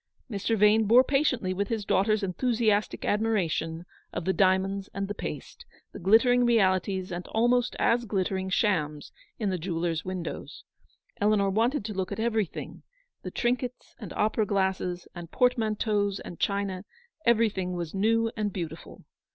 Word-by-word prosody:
Mr. 210 +2 0
Yane 210 +1 +5
bore 240 +4 +7
patiently 260 -9 +1
with 200 +2 -1
his 220 -2 -3
daughter's 215 +2 +2
enthusiastic 215 +1 0
admiration 175 -6 0 0.3
of 165 - -4
the 190 - +2
diamonds 190 +1 +1
and 195 0 -2
the 205 - -3
paste, - - -7 0.3
the - - -9
glittering 230 +6 +4
realities 190 -4 +2
and 175 0 -5
almost 240 +2 +1
as 240 +1 +2
glitter 195 -3 -1
ing 190 0 -3
shams 155 -8 0 0.3
in 210 -4 -1
the 185 - -2
jewellers' 165 -1 -2
windows. 185 -2 -6 0.5
Eleanor 205 -1 +2
wanted 230 +4 +1
to 215 - -4
look 190 -1 -3
at - - -4
everything, 220 -5 -2 0.4
the - - -5
trinkets, 250 0 -2
and 210 -7 -8
opera 215 0 +1
glasses, 190 -3 -1
and 175 -2 -8
portmanteaus, 215 -4 +1
and 175 - -9
china, 200 -2 -1 0.2
— 470 -10 -37
everything 210 -6 +2
was 170 -2 -4
new 225 +3 +2
and 210 -2 -1
beautiful. 165 -3 -7
200 Hz, 150 wpm, -27 LUFS, 185-225 Hz, 0.5 s, bore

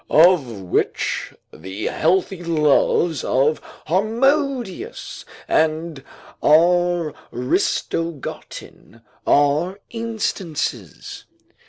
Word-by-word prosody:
Of 165 -4 +5
which 90 - -1 0.2
the 95 +6 -7
healthy 180 +2 0
loves 160 -1 +2
of 140 +4 +1 0.2
Harmodius 255 - -1 0.2
and 155 -2 0 0.4
Aristogiton 165 -5 -1 0.2
are 150 +7 +2
instances. 170 - -4
165 Hz, 55 wpm, -21 LUFS, 145-190 Hz, 0.4 s, Of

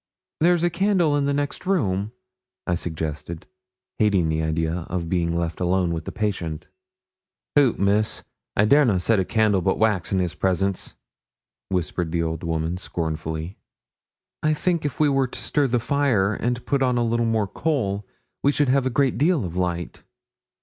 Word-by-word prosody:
'There's 175 +1 +3
a 175 - +2
candle 180 -4 +2
in 145 -1 +1
the 140 - +1
next 145 +5 -3
room,' 105 - 0 0.5
I 85 - 0
suggested, 80 0 -4 0.5
hating 100 -6 +3
the 80 0 0
idea 80 +1 -1
of 85 -2 -3
being 85 -2 0
left 85 -1 -2
alone 90 -1 +1
with 80 -1 -4
the - - -4
patient. 90 -7 -3 0.9
'Hoot! 140 -5 +4
Miss. 100 +2 +1 0.3
I 105 - +5
dare 145 +7 +6
na' 110 -8 +2
set 105 +4 +2
a - - +2
candle 110 -3 +2
but - - +1
wax 105 -6 +1
in 95 - +2
his 90 -2 0
presence,' 95 +1 -1 0.7
whispered 90 -2 -1
the 85 0 0
old 80 -1 -3
woman, 80 +1 -1
scornfully. 80 0 -4 0.8
'I 155 0 +2
think 170 0 0
if 145 - -3
we 155 - +4
were 135 -2 +2
to - - -8
stir 145 -2 +1
the 125 -1 +1
fire, 120 -6 +1
and 120 +2 -2
put 140 -1 0
on 125 -2 +2
a 120 - +2
little 115 0 +1
more 110 -2 +1
coal, 105 -7 -1 0.4
we 140 - +4
should 145 -2 +1
have 130 0 +3
a - - +1
great 135 +1 +1
deal 155 - +2
of 85 -1 -6
light.' 85 -2 -2
100 Hz, 175 wpm, -23 LUFS, 85-135 Hz, 0.9 s, dare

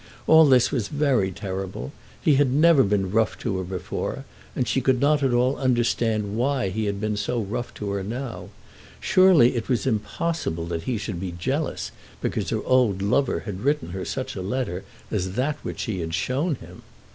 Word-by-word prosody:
All 160 -1 +7
this 125 -3 +5
was 120 -7 -1
very 140 -9 +1
terrible. 95 - -5 0.3
He 150 - +3
had 140 -1 +4
never 150 +2 +5
been 100 -4 +1
rough 110 +1 +1
to 100 -5 -2
her - - -2
before, 90 -1 -4 0.3
and 125 - 0
she 135 - +1
could 130 0 +2
not 145 +2 +3
at 135 -2 +2
all 125 +3 +2
understand 115 -5 +1
why 130 -2 0
he 110 +3 -2
had 100 -1 -2
been 105 0 -1
so 105 +4 -1
rough 120 +4 -3
to 100 -1 -4
her 100 0 -2
now. 120 +5 -5 0.5
Surely 180 -10 +5
it 115 +2 -3
was 125 -1 +1
impossible 110 - -2
that 85 -1 -4
he 120 - 0
should 100 -4 -4
be 90 -1 -4
jealous 135 - -2 0.3
because - - -2
her - - -1
old 120 -7 +2
lover 125 +6 +1
had 100 -3 -6
written 145 - 0
to - - -8
her 95 -1 -4
such 130 0 -4
a 95 - -4
letter 95 -2 -2 0.3
as 95 -3 -1
that 135 +6 0
which - - -6
she 105 -6 -3
had 80 -1 -2
shown 140 - 0
him! - - -13
115 Hz, 195 wpm, -24 LUFS, 95-135 Hz, 0.5 s, All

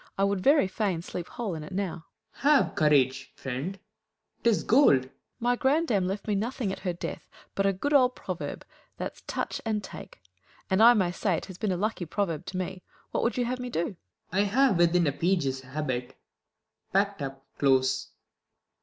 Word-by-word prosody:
I 195 - +2
would 200 -1 +1
very 280 -2 +5
fain 190 -3 -1
Sleep 175 -1 -5
whole 225 -6 -4
in 155 -2 -5
it 150 - -10
now. 180 -4 -3 0.3
Claud. - - -18 0.2
Have - - -9
courage, 135 -3 +2
friend, 135 +9 -4 0.7
'tis 230 -3 +3
gold! 225 - +5
Fool. 130 - -16 0.3
My 245 +1 +2
grandam 265 - +2
left 195 +2 -3
me 210 - +1
nothing 220 +1 -1
at - - -5
her 185 -2 -1
death 175 - -6 0.2
But 195 0 +1
a 195 - +2
good 285 +11 -2
old 255 -3 +5
proverb, - - -5 0.3
that's - - -5
Touch - - -3
and 215 -2 -1
Take: - - -10 0.5
And 190 +3 +3
I 240 +2 +9
may 185 -5 +2
say 180 -1 0
't - - -10
has 185 - -9
been 215 -3 0
a 180 - 0
lucky 200 -3 -2
proverb 175 -3 -2
To 185 - -4
me. 185 0 -4 0.3
AVhat - - +1
would 235 - 0
you 245 - +1
have 250 +1 -2
me 250 0 -4
do 170 -7 0
1 - - -9
Claud. - - -26 0.3
I 190 - +2
have 245 0 +3
within 175 0 +4
a 145 - +2
Page's 145 -5 0
habit, 130 -2 -4 0.7
packt 200 -2 +1
up 135 0 -6
Close. 130 -1 +2
190 Hz, 200 wpm, -28 LUFS, 155-220 Hz, 0.7 s, I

